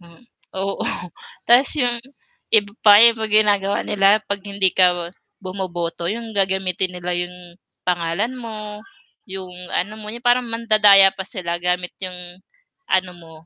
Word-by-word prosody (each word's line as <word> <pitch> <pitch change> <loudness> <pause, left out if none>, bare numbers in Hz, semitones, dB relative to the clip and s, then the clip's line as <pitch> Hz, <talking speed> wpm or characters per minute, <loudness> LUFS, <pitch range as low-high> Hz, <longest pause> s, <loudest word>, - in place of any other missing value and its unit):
Hmm, 170 +7 -19 0.3
oo 195 +1 -3 0.6
'tas 255 +5 +4
'yon, 245 -4 0 0.6
iba 205 -1 +1
pa 205 -1 +7
'yung 230 -1 +5
ginagawa 205 -2 +2
nila, 200 0 +3
'pag 200 0 -2
hindi 200 -2 0
ka 175 -1 +2 0.3
bumoboto, 175 -3 -4
'yong 225 +2 -5
gagamitin 190 -2 0
nila 180 0 -4
'yong 175 0 -7 0.2
pangalan 175 +6 -1
mo, 215 -4 -8 0.5
'yong 190 -1 -8 0.2
ano 210 +4 -3
mo, 210 - -8 0.2
parang 245 0 +2
mandadaya 215 -4 +5
pa - - -11
sila 170 -2 -4
gamit 180 0 -1
'yong 185 -1 -5 0.7
ano 185 -1 0
mo, 165 -2 -15
195 Hz, 135 wpm, -20 LUFS, 180-215 Hz, 0.7 s, pa